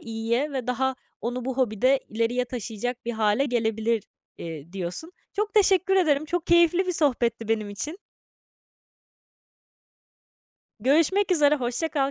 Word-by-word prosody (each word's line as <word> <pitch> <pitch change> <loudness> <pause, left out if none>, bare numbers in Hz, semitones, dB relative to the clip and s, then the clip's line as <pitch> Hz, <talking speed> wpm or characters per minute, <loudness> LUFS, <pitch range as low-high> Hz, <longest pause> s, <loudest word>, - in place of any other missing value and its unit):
iyiye 230 +5 -2
ve 260 -3 -3
daha 260 +1 0 0.3
onu 245 +1 -3
bu 260 -1 -3
hobide 255 +2 +2
ileriye 230 +3 0
taşıyacak 245 0 -5
bir 240 - -2
hâle 220 +4 +2
gelebilir, 225 -3 0 0.4
eee, 165 0 -8
diyorsun. 195 - -5 0.2
Çok 420 +1 -2
teşekkür 385 -2 +4
ederim. 310 -5 +3
Çok 345 +2 -3
keyifli 345 +2 +4
bir 360 - 0
sohbetti 240 -8 0
benim 215 -2 0
için. 300 - -5 2.8
Görüşmek 330 - +3
üzere. 300 -3 +4
Hoşça 250 +5 -2
kal. 280 -3 0
250 Hz, 130 wpm, -25 LUFS, 225-315 Hz, 2.8 s, teşekkür